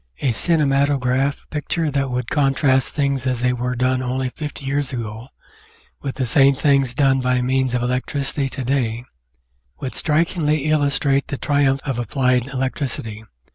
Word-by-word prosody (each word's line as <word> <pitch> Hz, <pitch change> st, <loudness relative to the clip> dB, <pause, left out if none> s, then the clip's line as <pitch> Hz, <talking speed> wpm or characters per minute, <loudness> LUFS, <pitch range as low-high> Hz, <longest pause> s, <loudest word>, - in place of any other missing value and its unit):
A 135 Hz, -, +2 dB
cinematograph 140 Hz, -, +1 dB
picture 155 Hz, +1 st, -1 dB
that 135 Hz, -1 st, 0 dB
would 125 Hz, 0 st, -3 dB
contrast 135 Hz, -2 st, +2 dB
things 140 Hz, -3 st, 0 dB
as 125 Hz, -2 st, -1 dB
they 125 Hz, 0 st, +2 dB
were 125 Hz, +1 st, -2 dB
done 130 Hz, +1 st, +1 dB
only 130 Hz, 0 st, -1 dB
fifty 145 Hz, 0 st, -7 dB
years 140 Hz, 0 st, -1 dB
ago, 115 Hz, -1 st, -5 dB, 0.7 s
with 135 Hz, -2 st, -4 dB
the 130 Hz, -, -1 dB
same 135 Hz, +2 st, +4 dB
things 135 Hz, -3 st, +2 dB
done 135 Hz, -2 st, +3 dB
by 125 Hz, 0 st, +1 dB
means 130 Hz, 0 st, +1 dB
of 120 Hz, -, 0 dB
electricity 135 Hz, +2 st, -1 dB
to 135 Hz, 0 st, -5 dB
day, 120 Hz, -2 st, -1 dB, 0.7 s
would 130 Hz, -, -4 dB
strikingly 155 Hz, -2 st, +1 dB
illustrate 140 Hz, -2 st, +1 dB
the 140 Hz, -, -4 dB
triumphs 140 Hz, -2 st, +1 dB
of 135 Hz, -4 st, -2 dB
applied 125 Hz, 0 st, +1 dB
electricity. 130 Hz, -5 st, -3 dB
135 Hz, 150 wpm, -21 LUFS, 125-140 Hz, 0.7 s, same